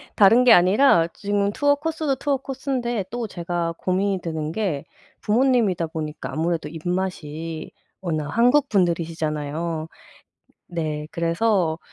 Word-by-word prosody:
다른 225 Hz, +5 st, +6 dB
게 250 Hz, -, +8 dB
아니라 180 Hz, -1 st, +5 dB
지금 205 Hz, 0 st, 0 dB
투어 285 Hz, +5 st, +2 dB
코스도 310 Hz, -2 st, -2 dB
투어 275 Hz, +1 st, 0 dB
코스인데 255 Hz, -5 st, -3 dB
또 240 Hz, -1 st, -4 dB
제가 175 Hz, -2 st, -3 dB
고민이 190 Hz, +1 st, 0 dB
되는 160 Hz, -2 st, -3 dB
게 175 Hz, -9 st, -2 dB, 0.4 s
부모님이다 215 Hz, -7 st, +2 dB
보니까 155 Hz, -1 st, -5 dB
아무래도 160 Hz, -1 st, -1 dB
입맛이 165 Hz, -2 st, -4 dB, 0.3 s
워낙 155 Hz, -5 st, -2 dB
한국 250 Hz, +5 st, +3 dB
분들이시잖아요? 160 Hz, -3 st, -1 dB, 0.8 s
네. 155 Hz, -3 st, -3 dB
그래서 170 Hz, -1 st, +1 dB
180 Hz, 290 characters per minute, -23 LUFS, 160-230 Hz, 0.8 s, 게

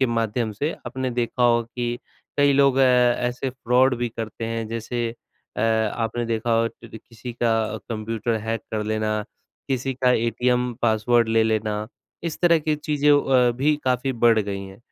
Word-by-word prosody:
के 130 Hz, -, +4 dB
माध्यम 115 Hz, -1 st, -1 dB
से 145 Hz, +10 st, -2 dB
आपने 130 Hz, 0 st, -3 dB
देखा 120 Hz, +1 st, -1 dB
हो 120 Hz, -1 st, +4 dB
कि 120 Hz, +1 st, -4 dB, 0.4 s
कई 145 Hz, 0 st, +4 dB
लोग 140 Hz, -1 st, +4 dB
ऐसे 125 Hz, 0 st, +2 dB
फ्रॉड 125 Hz, +1 st, +2 dB
भी 120 Hz, -1 st, -1 dB
करते 115 Hz, 0 st, -6 dB
हैं 115 Hz, -1 st, -3 dB
जैसे 115 Hz, +1 st, -3 dB, 0.5 s
अ, -, -, -2 dB
आपने 115 Hz, +1 st, 0 dB
देखा 115 Hz, +1 st, -1 dB
हो 115 Hz, -, +1 dB
टर 115 Hz, -1 st, -13 dB
किसी 115 Hz, +2 st, -10 dB
का 120 Hz, -1 st, +1 dB, 0.4 s
कंप्यूटर 115 Hz, +1 st, -2 dB
हैक 115 Hz, 0 st, -3 dB
कर 110 Hz, -1 st, -1 dB
लेना, 110 Hz, 0 st, -1 dB, 0.5 s
किसी 135 Hz, 0 st, -1 dB
का 125 Hz, 0 st, +2 dB
एटीएम 125 Hz, +1 st, +1 dB
पासवर्ड 115 Hz, +1 st, +3 dB
ले 115 Hz, 0 st, +3 dB
लेना, 110 Hz, -1 st, 0 dB, 0.5 s
इस 170 Hz, -2 st, -4 dB
तरह 170 Hz, -2 st, +5 dB
की 155 Hz, 0 st, 0 dB
चीज़ों 145 Hz, -1 st, +3 dB
अ, 125 Hz, -2 st, +3 dB
भी 150 Hz, +3 st, +2 dB
काफ़ी 130 Hz, +1 st, +1 dB
बढ़ 115 Hz, -1 st, +4 dB
गई 100 Hz, -2 st, -2 dB
हैं। 95 Hz, 0 st, -12 dB
120 Hz, 170 wpm, -23 LUFS, 110-125 Hz, 0.5 s, तरह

